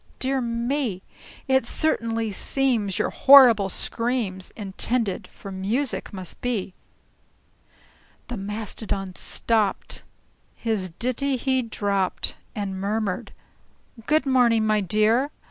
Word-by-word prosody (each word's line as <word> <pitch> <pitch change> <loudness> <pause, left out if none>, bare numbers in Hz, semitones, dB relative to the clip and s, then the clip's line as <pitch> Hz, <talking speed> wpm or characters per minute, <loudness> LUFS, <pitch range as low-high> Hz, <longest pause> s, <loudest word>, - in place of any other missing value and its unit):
"Dear 265 0 0
me! 235 -3 -2 0.4
It 265 0 +3
certainly 230 -5 0
seems 225 -3 0
your - - 0
horrible 245 -8 +7
screams 230 -4 -2
Intended 210 +1 -1
for 195 - -11
music 215 +8 -1
must 185 -3 -7
be!" 220 -7 -2 1.5
The 245 - -5
Mastodon 200 -2 -4
stopped, 215 +1 -1 0.5
his 215 -5 -2
ditty 260 +3 0
he 260 +1 +1
dropped, 200 -5 -2 0.2
And 195 -2 -4
murmured, 200 -2 -2 0.8
"Good 305 -1 +3
morning, 240 -4 +3
my 215 -1 +2
dear! 215 +8 +2
225 Hz, 100 wpm, -24 LUFS, 200-255 Hz, 1.5 s, horrible